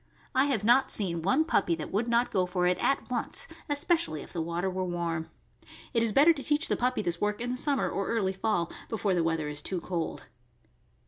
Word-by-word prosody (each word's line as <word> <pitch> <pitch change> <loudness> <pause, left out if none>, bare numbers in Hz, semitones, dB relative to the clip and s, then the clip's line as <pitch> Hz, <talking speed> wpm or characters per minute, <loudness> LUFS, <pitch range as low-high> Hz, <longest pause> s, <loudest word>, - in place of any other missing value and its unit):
I 265 +1 +4
have 255 -8 0
not 245 +5 +4
seen 170 -5 +3
one 265 - +2
puppy 185 - +1
that 155 -2 -7
would 215 +5 0
not 235 +1 +2
go 185 -1 +1
for 180 0 0
it 180 0 +2
at 275 - +1
once, 240 - -2 0.2
especially 290 - +1
if - - -14
the 170 - -2
water 170 +3 -2
were 185 0 -2
warm. 170 -2 -3 0.6
It 230 - +2
is 230 -1 +2
better 295 +9 +6
to 285 - -7
teach 295 +3 +1
the - - +2
puppy 250 +1 0
this 175 -1 -1
work 210 0 0
in 245 +1 -3
the - - -1
summer 280 +1 +1
or 195 - -2
early 200 -5 0
fall, 190 -3 -1 0.2
before 210 -4 0
the 175 -2 +1
weather 165 -2 -1
is 150 0 -1
too 185 +4 -3
cold. 170 -1 -4
195 Hz, 220 wpm, -28 LUFS, 170-250 Hz, 0.6 s, better